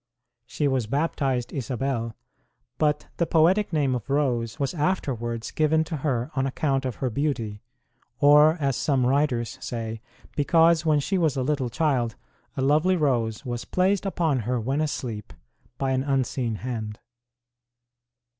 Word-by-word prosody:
She 150 - -1
was 130 -5 0
baptized 135 -2 -1
Isabel, 125 -2 -2 0.6
but 150 -1 +1
the 170 - +1
poetic 180 +6 +3
name 145 -5 +1
of 125 -2 -4
Rose 125 -6 0
was 140 +2 -1
afterwards 125 -9 -2
given 155 +1 +2
to 160 0 -4
her 130 -2 -1
on 135 0 +1
account 135 0 0
of 130 - -2
her 130 -2 -2
beauty, 115 -6 -2 0.6
or, 150 +2 +6
as 135 -3 0
some 135 -2 +1
writers 125 -3 0
say, 115 -2 -4 0.3
because 165 +2 +4
when 150 -1 +4
she 185 +6 0
was 155 -5 +1
a 130 - 0
little 135 -2 0
child 125 -6 0 0.4
a 130 - 0
lovely 155 +7 +3
rose 125 -6 0
was 120 -1 -3
placed 190 +2 +1
upon 160 -8 +1
her 120 +2 -1
when 135 +6 -1
asleep 120 -8 -4 0.4
by 135 -1 -1
an 130 0 +1
unseen 130 -4 -1
hand. 110 -3 -5
135 Hz, 145 wpm, -25 LUFS, 120-150 Hz, 0.6 s, or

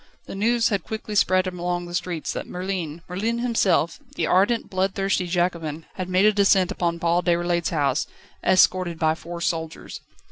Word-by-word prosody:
The - - -8
news 230 +4 +2
had 200 -6 -1
quickly 220 -1 -6
spread 185 -2 +3
along 175 -1 -3
the 175 - -9
streets 175 -2 -3
that - - -5
Merlin, 180 -3 -4
Merlin 215 +6 -2
himself, 225 -8 +1 0.2
the - - 0
ardent, 205 +6 +2
bloodthirsty 190 0 0
Jacobin, 170 -3 -1
had 185 -1 -5
made 185 +2 +3
a 215 - +5
descent 195 -2 +3
upon 170 -4 -1
Paul 170 +1 +1
Déroulède's 175 -1 +1
house, 145 -3 0 0.4
escorted 185 -2 +3
by 160 -1 +2
four 170 +1 -8
soldiers. 160 -1 -3
180 Hz, 165 wpm, -24 LUFS, 170-195 Hz, 0.4 s, a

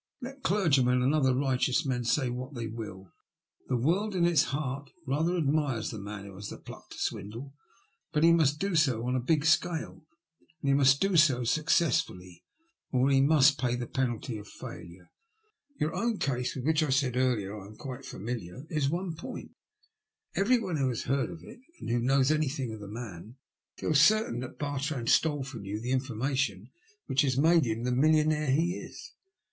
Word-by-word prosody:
Let 270 +2 -8
clergymen 135 - +2
and 135 +4 +2
other 135 -4 +3
righteous 130 +2 +1
men 125 -3 -1
say 125 +1 +1
what 130 +3 -6
tiiey 115 -2 -5
will, 95 -5 -8 0.6
the 125 - +1
world 185 - 0
in 175 -2 +3
its 170 -4 +4
heart 140 -1 -4 0.2
rather 160 +7 0
admires 145 -7 0
the 110 - -6
man 100 0 -7
who 100 - -10
has 100 +2 -7
the - - -8
pluck - - -12
to - - -11
swindle, 115 +7 -5 0.6
but 150 -1 +1
he 165 0 +7
must 150 -3 +3
do 195 -1 -1
so 130 -7 +2
on 125 +1 0
a - - +1
big 145 +4 +1
scale, 160 0 0 0.5
and 145 - -5
he - - +5
must 135 0 +4
do 195 -1 +2
so 135 -6 +4
successfully, 115 - 0 0.5
or 130 +1 +2
he 135 0 +5
must 140 -1 +5
pay 125 -1 0
the 120 0 -3
penalty 120 -2 -2
of 105 - -11
failure. 90 -1 -11 0.7
Your 155 +2 0
own 230 -2 -1
case, 125 -5 -1
with 130 -1 -5
which, 160 0 +3
as 155 - +1
I - - -1
said 130 -2 +1
earlier, 120 -6 0
I 100 -2 -9
am 105 - -13
quite 130 0 -8
familiar, 115 - -6
is 150 -4 +1
one 175 +4 -2
in 165 - -5
point. 165 - -8 0.8
Everyone 200 -5 +1
who 135 -2 +1
has 120 - -3
heard 135 -3 0
of 85 -2 -10
it, - - -12 0.2
and - - -5
who 120 - +2
knows 135 +3 +3
anything 140 -6 -1
of 110 - -8
the 105 - -9
man, 105 -1 -8 0.4
feels 150 -2 +2
certain 210 - +3
that 130 0 -7
Bartrand 145 -3 -2
stole 145 -4 +3
from 130 -5 -8
you 100 +2 -4
the 120 +3 -4
information 130 -4 -1 0.3
which 135 - +2
has 130 -3 +1
made 160 +1 +4
him 115 0 -2
the 125 - 0
millionaire 155 +2 +3
he 165 +7 +1
is. - - -10
135 Hz, 195 wpm, -29 LUFS, 120-155 Hz, 0.8 s, he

